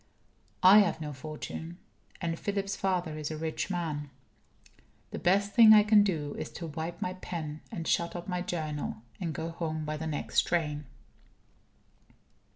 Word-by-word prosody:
I 190 Hz, +3 st, +10 dB
have 200 Hz, -5 st, +2 dB
no 150 Hz, -2 st, -5 dB
fortune. 155 Hz, +4 st, -7 dB, 0.4 s
And 165 Hz, -1 st, -2 dB
Philip's 200 Hz, -1 st, -2 dB
father 180 Hz, -5 st, -1 dB
is 150 Hz, -, -3 dB
a 155 Hz, -, -4 dB
rich 160 Hz, +3 st, -3 dB
man. 155 Hz, -5 st, -3 dB, 1.0 s
The -, -, -4 dB
best 200 Hz, +3 st, +2 dB
thing 220 Hz, 0 st, +9 dB
I 210 Hz, -1 st, +8 dB
can 210 Hz, 0 st, +6 dB
do 155 Hz, -7 st, -1 dB
is -, -, -4 dB
to 170 Hz, -, -6 dB
wipe 165 Hz, +2 st, -4 dB
my 180 Hz, -, -2 dB
pen, 155 Hz, -4 st, -6 dB
and 170 Hz, -7 st, -5 dB
shut 170 Hz, +1 st, +1 dB
up 175 Hz, 0 st, -6 dB
my 180 Hz, -2 st, -1 dB
Journal, 155 Hz, -9 st, -4 dB, 0.2 s
and 170 Hz, -3 st, -2 dB
go 160 Hz, +1 st, -4 dB
home 160 Hz, -2 st, -3 dB
by 155 Hz, 0 st, -3 dB
the 160 Hz, +1 st, -4 dB
next 150 Hz, -2 st, +1 dB
train. 150 Hz, -4 st, -1 dB
165 Hz, 165 wpm, -30 LUFS, 155-185 Hz, 1.0 s, I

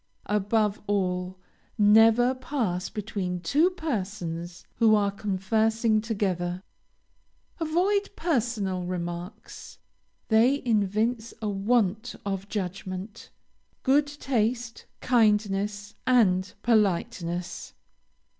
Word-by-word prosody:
Above 210 Hz, +1 st, +1 dB
all, 185 Hz, -2 st, -1 dB, 0.4 s
never 225 Hz, +4 st, +5 dB
pass 250 Hz, -9 st, -2 dB
between 200 Hz, -4 st, -4 dB
two 290 Hz, -, +3 dB
persons 185 Hz, -, -4 dB
who 220 Hz, -1 st, +5 dB
are 200 Hz, -1 st, +2 dB
conversing 215 Hz, +3 st, +1 dB
together. 185 Hz, -5 st, -2 dB, 1.0 s
Avoid 370 Hz, +6 st, +1 dB
personal 230 Hz, -, -1 dB
remarks; 175 Hz, +3 st, -6 dB, 0.5 s
they 230 Hz, +5 st, +5 dB
evince 220 Hz, +1 st, 0 dB
a 215 Hz, -, -2 dB
want 215 Hz, +2 st, 0 dB
of 195 Hz, 0 st, -3 dB
judgment, 190 Hz, +1 st, -5 dB, 0.5 s
good 285 Hz, +2 st, +3 dB
taste, 245 Hz, -5 st, -2 dB
kindness, 210 Hz, -3 st, +1 dB
and 195 Hz, -7 st, +3 dB
politeness. 180 Hz, -5 st, 0 dB
210 Hz, 80 wpm, -26 LUFS, 185-235 Hz, 1.0 s, never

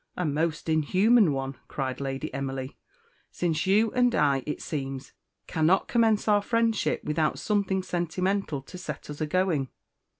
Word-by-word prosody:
"A 180 Hz, -, -1 dB
most 155 Hz, +2 st, -1 dB
inhuman 185 Hz, +6 st, +4 dB
one!" 135 Hz, -1 st, -3 dB
cried 135 Hz, -1 st, -3 dB
Lady 135 Hz, -1 st, -4 dB
Emily, 135 Hz, -1 st, -4 dB, 0.5 s
"since 170 Hz, 0 st, -1 dB
you 210 Hz, +3 st, +4 dB
and 245 Hz, -1 st, +2 dB
I, 140 Hz, -3 st, +3 dB
it 150 Hz, -, -3 dB
seems, 135 Hz, -2 st, -5 dB, 0.3 s
cannot 165 Hz, +4 st, +2 dB
commence 225 Hz, -3 st, +2 dB
our 205 Hz, -1 st, +4 dB
friendship 230 Hz, 0 st, 0 dB
without 150 Hz, 0 st, 0 dB
something 195 Hz, -3 st, 0 dB
sentimental 180 Hz, -3 st, -1 dB
to 180 Hz, -, -10 dB
set 180 Hz, -, -6 dB
us 150 Hz, -, -8 dB
agoing. 155 Hz, -3 st, +1 dB
165 Hz, 140 wpm, -27 LUFS, 140-200 Hz, 0.5 s, inhuman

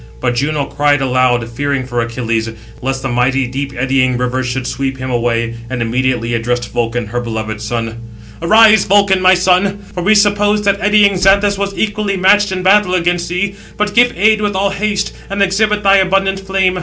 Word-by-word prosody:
But 125 Hz, -1 st, -1 dB
Juno 140 Hz, +3 st, -1 dB
cried 145 Hz, 0 st, +1 dB
aloud, 125 Hz, -3 st, +1 dB
fearing 135 Hz, +3 st, -3 dB
for 120 Hz, -2 st, -2 dB
Achilles, 115 Hz, -1 st, -2 dB, 0.3 s
lest 135 Hz, 0 st, -3 dB
the -, -, -1 dB
mighty 130 Hz, +2 st, 0 dB
deep 135 Hz, +3 st, -5 dB
eddying 130 Hz, 0 st, 0 dB
river 125 Hz, +1 st, -2 dB
should 125 Hz, 0 st, -3 dB
sweep 135 Hz, 0 st, -3 dB
him 130 Hz, 0 st, -5 dB
away; 115 Hz, -1 st, -1 dB, 0.2 s
and 130 Hz, -1 st, -4 dB
immediately 120 Hz, 0 st, -1 dB
addressed 120 Hz, 0 st, -2 dB
Vulcan, 120 Hz, 0 st, -2 dB
her 120 Hz, +4 st, -4 dB
beloved 110 Hz, -2 st, -5 dB
son: 115 Hz, 0 st, -4 dB, 0.4 s
"Arise, 215 Hz, +4 st, +5 dB
Vulcan, 195 Hz, -1 st, +3 dB
my 185 Hz, 0 st, +5 dB
son; 185 Hz, +2 st, +1 dB, 0.2 s
for 180 Hz, -, -4 dB
we 205 Hz, +5 st, +3 dB
supposed 205 Hz, 0 st, +2 dB
that 200 Hz, 0 st, 0 dB
eddying 205 Hz, -1 st, +3 dB
Xanthus 200 Hz, +2 st, +3 dB
was 200 Hz, 0 st, -3 dB
equally 205 Hz, -2 st, -1 dB
matched 205 Hz, +2 st, +3 dB
in 185 Hz, -1 st, -3 dB
battle 190 Hz, -1 st, +3 dB
against 175 Hz, -1 st, -1 dB
thee; 185 Hz, +3 st, -2 dB, 0.2 s
but 210 Hz, 0 st, -1 dB
give 245 Hz, +1 st, +4 dB
aid 215 Hz, +3 st, +3 dB
with 205 Hz, -2 st, -2 dB
all 195 Hz, +1 st, 0 dB
haste, 205 Hz, 0 st, -2 dB, 0.2 s
and 200 Hz, 0 st, 0 dB
exhibit 210 Hz, +2 st, 0 dB
thy 195 Hz, 0 st, +5 dB
abundant 195 Hz, 0 st, +1 dB
flame. 190 Hz, -1 st, 0 dB
170 Hz, 185 wpm, -14 LUFS, 125-200 Hz, 0.4 s, Arise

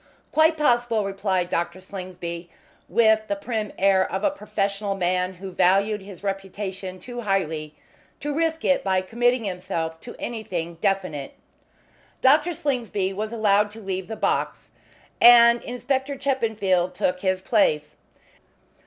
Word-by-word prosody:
"Quite 315 Hz, +1 st, +4 dB
possible," 240 Hz, -7 st, +2 dB
replied 195 Hz, -2 st, -1 dB
Dr. 170 Hz, +2 st, -1 dB
Slingsby, 180 Hz, -3 st, -7 dB, 0.4 s
with 220 Hz, +1 st, +3 dB
the 300 Hz, -, -1 dB
prim 225 Hz, -8 st, -3 dB
air 190 Hz, -1 st, +3 dB
of 190 Hz, +2 st, -2 dB
a 290 Hz, -, +3 dB
professional 200 Hz, -5 st, -2 dB
man 180 Hz, 0 st, 0 dB
who 190 Hz, +1 st, -8 dB
valued 200 Hz, +4 st, +2 dB
his 195 Hz, -1 st, -11 dB
reputation 195 Hz, -1 st, -4 dB
too 245 Hz, +2 st, -7 dB
highly 160 Hz, -7 st, -2 dB, 0.4 s
to 290 Hz, 0 st, -3 dB
risk 325 Hz, +1 st, -1 dB
it 275 Hz, -, +3 dB
by 190 Hz, -1 st, +2 dB
committing 240 Hz, +5 st, +1 dB
himself 180 Hz, -4 st, -4 dB
to 240 Hz, -, -9 dB
anything 175 Hz, -8 st, -5 dB
definite. 185 Hz, -8 st, -1 dB, 0.8 s
Dr. 300 Hz, +6 st, +4 dB
Slingsby 235 Hz, -, -1 dB
was 215 Hz, +3 st, -4 dB
allowed 210 Hz, -2 st, +3 dB
to 215 Hz, +2 st, -11 dB
leave 190 Hz, -3 st, -4 dB
the 220 Hz, -, -5 dB
box, -, -, -2 dB, 0.5 s
and 235 Hz, 0 st, +8 dB
Inspector 265 Hz, +3 st, -2 dB
Chippenfield 215 Hz, -10 st, 0 dB
took 180 Hz, 0 st, 0 dB
his 185 Hz, 0 st, -1 dB
place. 150 Hz, -10 st, +2 dB
200 Hz, 135 wpm, -24 LUFS, 185-235 Hz, 0.8 s, and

